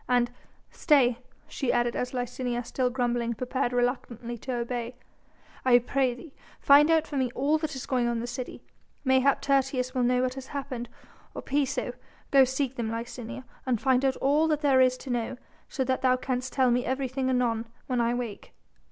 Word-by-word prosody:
"And 245 -1 +2 0.4
stay 255 -7 +3
" - - -34
she 265 - +1
added 240 0 +1
as 250 - -2
Licinia 245 -1 -3
still 255 0 0
grumbling 240 -2 -1
prepared 255 +2 -1
reluctantly 245 -1 -2
to 260 - -5
obey 240 0 -3 0.7
"I 250 -2 +6
pray 250 +1 0
thee 275 +3 -12 0.3
find 290 +2 +6
out 320 -1 +4
for 290 - -5
me 255 -2 0
all 295 +4 +2
that 310 -2 -3
is 260 - -5
going 250 -3 +1
on 240 - 0
in 230 - -2
the 235 - -3
city. 245 +1 -6 0.4
Mayhap 265 +1 +3
Tertius 260 -2 +1
will 255 - 0
know 250 +1 +2
what 255 0 0
has 265 0 -8
happened 260 -4 -5 0.5
or - - -6
Piso.... 280 0 -1 0.4
Go 270 -1 +7
seek 265 0 -2
them, 230 -2 -2
Licinia, 235 +2 -6 0.2
and 245 -4 +1
find 260 +1 +2
out 265 -1 +2
all 295 +4 +2
that 305 -2 0
there 275 -3 +4
is 255 0 +4
to 260 - -7
know, 240 +1 -2 0.3
so 265 - -1
that 260 0 -1
thou 255 -1 +4
canst 255 0 -3
tell 260 -2 +3
me 245 +1 +2
everything 260 0 -1
anon, 235 -3 0 0.2
when 250 -2 0
I 235 +1 +1
wake." 235 -5 -6
255 Hz, 195 wpm, -27 LUFS, 240-270 Hz, 0.7 s, Go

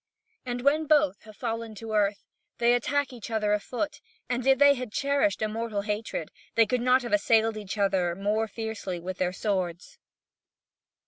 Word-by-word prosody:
And 245 0 -2
when 300 +4 +2
both 295 -7 +3
have 215 -1 -13
fallen 230 -2 -4
to 220 +1 -7
earth, 205 -1 +1 0.3
they 240 0 +4
attack 280 +3 0
each 235 -3 -8
other 215 -2 +1
afoot; 255 +8 -3 0.3
and 250 +1 -2
if 270 0 +6
they 285 0 +7
had 255 -4 -5
cherished 280 -6 +1
a - - +2
mortal 220 -1 -3
hatred, 210 -5 -3 0.2
they 230 - +6
could 245 +3 0
not 255 +1 +4
have 240 - -4
assailed 220 +2 +3
each 205 -1 -6
other 190 -4 +1
more 210 +3 0
fiercely 215 -4 -5
with 185 +2 -6
their 180 -1 +1
swords. 185 -3 -3
220 Hz, 175 wpm, -27 LUFS, 205-250 Hz, 0.3 s, they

